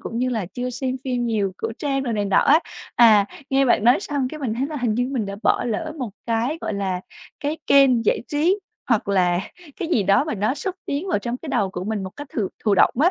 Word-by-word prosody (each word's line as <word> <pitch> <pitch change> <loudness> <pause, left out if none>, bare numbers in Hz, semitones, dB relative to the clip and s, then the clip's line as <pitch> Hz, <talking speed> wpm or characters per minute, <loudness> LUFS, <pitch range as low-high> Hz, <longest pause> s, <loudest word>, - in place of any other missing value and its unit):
cũng 230 - -5
như 255 +1 +1
là 225 -7 -2
chưa 250 0 -3
xem 255 +1 -3
phim 250 -2 -1
nhiều, 205 -4 0
cổ 225 - -3
trang 275 -2 -1
đồ 245 -3 -2
này 205 -2 0
nọ 200 - +1
á. 305 +3 +5 0.3
À, 215 -4 +6 0.2
nghe 270 0 +3
bạn 235 -4 +3
nói 245 +7 +5
xong 285 -9 -2
cái 310 - -8
mình 240 -6 -1
thấy 260 +4 -1
là 305 +1 -5
hình 245 -5 0
như 245 +2 0
mình 235 -6 -1
đã 200 0 -5
bỏ - - +2
lỡ 230 -3 -2
một 250 -5 -3 0.2
cái, 235 +7 0
gọi - - -3
là, 190 -2 -2 0.4
cái 300 +2 -2
kênh 265 -4 +5
giải - - +2
trí 330 +7 +2 0.3
hoặc 225 -5 +1
là 180 -3 +2 0.4
cái 340 - -2
gì 240 -11 +2
đó 200 +7 +3
mà 310 - -3
nó 215 +5 0
xúc 370 +5 -4
tiến 290 +7 -2
vào 360 - +1
trong 235 +4 -3
cái 310 - -10
đầu 195 -7 0
của 180 0 -5
mình 210 -1 -2
một 190 - -5
cách 290 - -7
thụ 210 -6 0 0.2
thụ 210 -2 +4
động - - +5
á. 340 +4 +5
245 Hz, 260 wpm, -22 LUFS, 210-275 Hz, 0.4 s, À